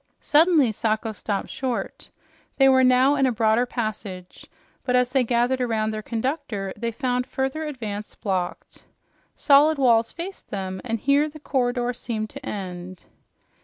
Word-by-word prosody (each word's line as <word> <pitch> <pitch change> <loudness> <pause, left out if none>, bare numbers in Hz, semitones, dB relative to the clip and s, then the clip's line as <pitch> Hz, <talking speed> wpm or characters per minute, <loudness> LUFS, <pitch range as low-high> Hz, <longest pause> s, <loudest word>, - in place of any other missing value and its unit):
Suddenly 305 -5 +4
Sacho 220 +1 -1
stopped 205 -1 -4
short. 255 -3 -4 0.5
They 270 - +6
were 260 -1 +5
now 255 +2 +5
in 275 -2 +2
a - - +1
broader 225 +2 +2
passage, 210 -6 -6 0.4
but 250 - 0
as 250 0 +2
they 265 -1 +3
gathered 245 +2 +1
around 220 -3 0
their 215 0 -4
conductor 225 -4 -3
they 235 0 -3
found 250 0 -1
further 270 +4 -2
advance 215 -7 -6
blocked. 185 -3 -4 0.5
Solid 295 +2 +5
walls 235 -4 +3
faced 370 +3 -8
them, 190 -2 -4
and 230 -2 -2
here 280 +6 +2
the 310 +1 -12
corridor 245 -3 -1
seemed 225 -3 -4
to - - -10
end. 185 -2 -6
245 Hz, 150 wpm, -24 LUFS, 215-265 Hz, 0.5 s, They